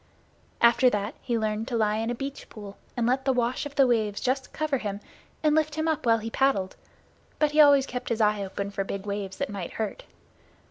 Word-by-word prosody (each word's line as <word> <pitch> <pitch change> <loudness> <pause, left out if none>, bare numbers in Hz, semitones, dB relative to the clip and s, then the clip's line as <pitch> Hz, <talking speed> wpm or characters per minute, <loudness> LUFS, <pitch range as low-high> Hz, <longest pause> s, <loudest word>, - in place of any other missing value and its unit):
After 235 +2 +6
that, 210 -1 -2
he 240 -3 -1
learned 215 +1 -2
to 245 -3 -1
lie 215 -1 +1
in 225 +1 -1
a 240 - -1
beach 275 +3 -6
pool 205 -2 -10 0.2
and 235 - +1
let 255 +3 +1
the 270 - +2
wash 250 +2 0
of 290 - -14
the 275 - +5
waves 220 -4 +1
just 265 0 -1
cover 300 -4 -1
him 205 -2 -4 0.4
and 305 -1 +4
lift 310 -1 +1
him 315 +1 -1
up 310 -6 -1
while 230 0 +5
he 225 +1 -6
paddled, 225 -9 +1 0.6
but 300 -1 +2
he 305 +1 +6
always 285 -2 +6
kept 250 -1 -5
his 230 -1 -1
eye 210 -2 +2
open 200 +1 -4
for 195 0 -2
big 195 0 -5
waves 200 -2 -4
that - - -1
might 195 -4 -5
hurt. 220 -2 -4
235 Hz, 225 wpm, -26 LUFS, 210-270 Hz, 0.6 s, After